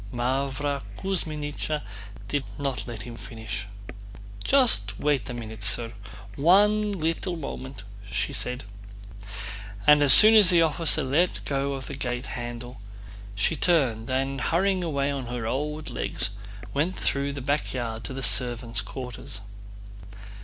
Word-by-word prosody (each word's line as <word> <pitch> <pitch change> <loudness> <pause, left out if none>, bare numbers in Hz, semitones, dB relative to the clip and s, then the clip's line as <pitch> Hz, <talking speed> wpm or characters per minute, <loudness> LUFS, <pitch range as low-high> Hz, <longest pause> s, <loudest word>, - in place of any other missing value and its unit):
Mávra 135 +3 -1 0.2
Kuzmínichna 155 -5 -2 0.4
did 145 -2 -1
not 140 -3 -3
let 115 -3 -6
him 120 0 -8
finish. 110 -4 -7 0.8
"Just 165 - +2
wait 145 -7 0
a - - -4
minute, 110 -3 -7
sir. 115 +4 +1 0.4
One 205 +7 +4
little 175 0 -2
moment," 130 -7 -7 0.3
said - - -2
she. 125 0 -3 1.3
And 150 0 +7
as 145 -2 +8
soon 215 +1 +11
as 210 -5 +7
the 170 -2 +5
officer 160 -1 +3
let 150 +7 +1
go 140 0 -1
of 135 -1 -6
the 140 - -7
gate 125 -2 -3
handle 120 0 -7 0.5
she 100 +11 +1
turned 130 -11 +1
and, 135 0 -1
hurrying 185 +2 +1
away 140 -4 -1
on 135 -3 -4
her 120 -1 -4
old 150 +4 -3
legs, 110 -3 -2 0.4
went 160 +7 -1
through 140 0 -1
the 140 - -5
back 145 +3 -1
yard 115 -3 -4
to - - -5
the 135 - -4
servants' 120 -4 +3
quarters. 120 -2 -6
135 Hz, 140 wpm, -26 LUFS, 120-155 Hz, 1.3 s, soon